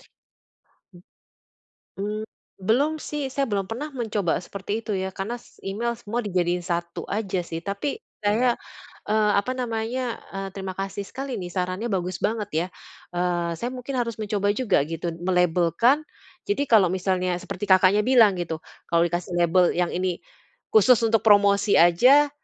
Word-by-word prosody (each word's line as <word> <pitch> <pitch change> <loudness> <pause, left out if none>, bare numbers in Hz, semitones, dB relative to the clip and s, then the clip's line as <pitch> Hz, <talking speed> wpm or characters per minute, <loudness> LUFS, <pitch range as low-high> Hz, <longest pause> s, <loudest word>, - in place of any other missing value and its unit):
Mmm. - - -23 1.9
Mmm, 210 +2 -3 0.4
belum 260 +10 +2
sih. 295 -2 -3
Saya 275 0 0
belum 200 -2 -1
pernah 260 +7 -4
mencoba 220 - -1
seperti 200 +4 -4
itu 215 - -3
ya, 190 0 -2
karena 215 +5 -3
s - - -22
email 230 +5 -2
semua 235 +1 -3
dijadiin 180 -3 0
satu 170 -1 -3
aja 200 -3 -1
sih. 165 -1 -5
Tapi 200 +8 -2 0.2
saya, 220 +4 +2 0.6
eee, 210 0 +3
apa 250 +5 -3
namanya, 235 0 -3
eee, 195 0 -3
terima 190 -1 -6
kasih 195 +1 -4
sekali 265 -4 -5
nih, 180 - -5
sarannya 185 +5 -2
bagus 185 -3 -2
banget 215 -2 -1
ya. 165 +3 0 0.5
Eee, 175 -1 0
saya 240 +6 -3
mungkin 255 +1 -5
harus 230 -3 -2
mencoba 205 -1 0
juga, 215 - +1
gitu, 165 +2 -4 0.2
melabelkan. 180 - +3 0.4
Jadi 290 -9 -1
kalau 195 -6 +5
misalnya 185 -1 0
seperti 185 - -5
Kakaknya 190 +2 +5
bilang, 230 -7 +5
gitu, 165 -2 -4 0.3
kalau 170 0 +3
dikasih 175 +2 -3
label 175 +1 +4
yang 175 0 0
ini 180 -1 -1 0.5
khusus 220 +3 +6
untuk 225 -1 +2
promosi 200 -1 +5
aja, 250 +13 +6
200 Hz, 150 wpm, -24 LUFS, 180-230 Hz, 1.9 s, khusus